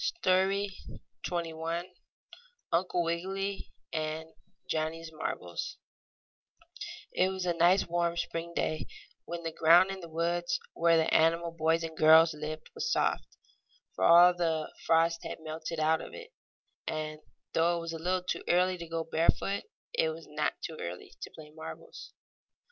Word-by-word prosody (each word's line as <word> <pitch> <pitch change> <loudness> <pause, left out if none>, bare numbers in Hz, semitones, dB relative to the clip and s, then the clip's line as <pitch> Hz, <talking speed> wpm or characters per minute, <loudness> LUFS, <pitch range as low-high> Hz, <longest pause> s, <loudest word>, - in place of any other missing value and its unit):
STORY 195 - +1 0.5
XXI 165 -1 -2 0.9
UNCLE 175 0 +1
WIGGILY 195 +4 -2 0.2
AND 155 0 -3 0.4
JOHNNIE'S 160 +1 -2
MARBLES 90 - -4 1.4
It 185 - +3
was 190 -1 -3
a 175 - +2
nice, 175 +3 +4
warm 170 0 0
spring 170 0 -3
day, 155 -4 -1 0.4
when 170 0 -5
the 165 - -2
ground 170 +4 +6
in 195 - -5
the 170 -2 -9
woods 175 +2 0
where 165 0 +4
the 160 0 +2
animal 165 +1 +3
boys 165 0 +1
and 160 -1 -5
girls 160 +1 +7
lived 155 +1 -6
was 480 - -2
soft, - - 0 0.6
for - - -3
all 175 +1 +8
the 165 -3 -1
frost 165 +1 +3
had - - -5
melted 160 +1 -5
out 160 +1 +3
of - - -9
it; 475 0 -11 0.5
and, 155 -1 -3 0.3
though 170 +1 +3
it - - -3
was 165 0 -5
a 165 - -5
little 180 +2 0
too 180 - -2
early 180 +1 +3
to 170 - -6
go 165 0 -2
barefoot, 165 +5 0 0.3
it 160 - +2
was 160 +1 -7
not 150 0 -1
too 160 - -5
early 85 +1 -6
to - - -5
play 150 -1 -13
marbles. 160 +1 -9
165 Hz, 150 wpm, -30 LUFS, 160-175 Hz, 1.4 s, all